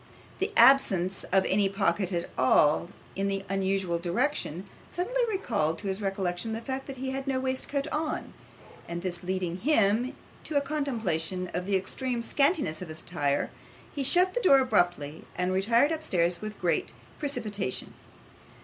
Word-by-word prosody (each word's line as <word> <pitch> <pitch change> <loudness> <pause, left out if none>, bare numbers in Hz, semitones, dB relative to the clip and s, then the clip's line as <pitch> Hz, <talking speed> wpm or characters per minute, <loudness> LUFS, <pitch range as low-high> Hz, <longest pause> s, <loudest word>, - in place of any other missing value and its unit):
The 395 +3 -1
absence 195 -9 +5
of 190 0 +2
any 195 +1 +2
pocket 195 -1 0
at 170 -1 -1
all 150 +5 +4 0.3
in 195 +1 0
the 195 0 -2
usual 190 -3 0
direction, 185 - -1 0.2
suddenly - - -1
recalled 205 - 0
to 205 - -6
his 190 +2 -2
recollection 195 +1 -1
the 225 - -2
fact 265 +2 -4
that 270 -1 -6
he 265 +1 -3
had 270 +1 -4
no 265 -1 +1
waistcoat 265 +2 -1
on; 305 0 -3 0.5
and 170 +1 -5
this 180 -2 -3
leading 180 -1 -2
him 225 0 +2 0.3
to 300 - -1
a - - +6
contemplation 220 - -2
of 180 +2 -3
the 200 - +2
extreme 235 +6 -2
scantiness 275 - +1
of 180 - -6
his 155 0 -6
attire, 145 -5 -1 0.4
he 285 - -3
shut 360 +7 +3
the - - 0
door 280 - +7
abruptly, 175 - 0
and 180 +1 0
retired 230 +9 +3
upstairs 180 - 0
with 215 -1 -6
great 180 - 0 0.3
precipitation. 215 - -3
195 Hz, 160 wpm, -28 LUFS, 175-270 Hz, 0.5 s, door